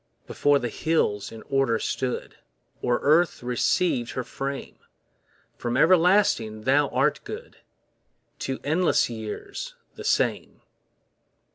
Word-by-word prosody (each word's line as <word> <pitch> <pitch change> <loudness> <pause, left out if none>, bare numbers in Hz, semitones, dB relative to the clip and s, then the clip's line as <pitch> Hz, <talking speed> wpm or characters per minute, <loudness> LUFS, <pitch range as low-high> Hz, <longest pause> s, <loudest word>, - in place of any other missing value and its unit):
Before 145 0 +2
the 125 - -2
hills 110 -12 0
in 115 -1 -10
order 135 -4 +1
stood, 125 +2 -3 0.4
Or 120 -1 +1
Earth 160 -1 +3
receiv'd 125 +1 +1
her 130 - -2
frame, 135 +3 -6 0.8
From 120 +1 -1
everlasting 165 - +4
Thou 140 +4 +3
art 135 +3 +1
good, 470 +3 -8 0.8
To 135 -1 -3
endless 160 -3 +2
years 405 - -6 0.2
the - - -9
same. - - 0
135 Hz, 110 wpm, -25 LUFS, 120-165 Hz, 0.8 s, everlasting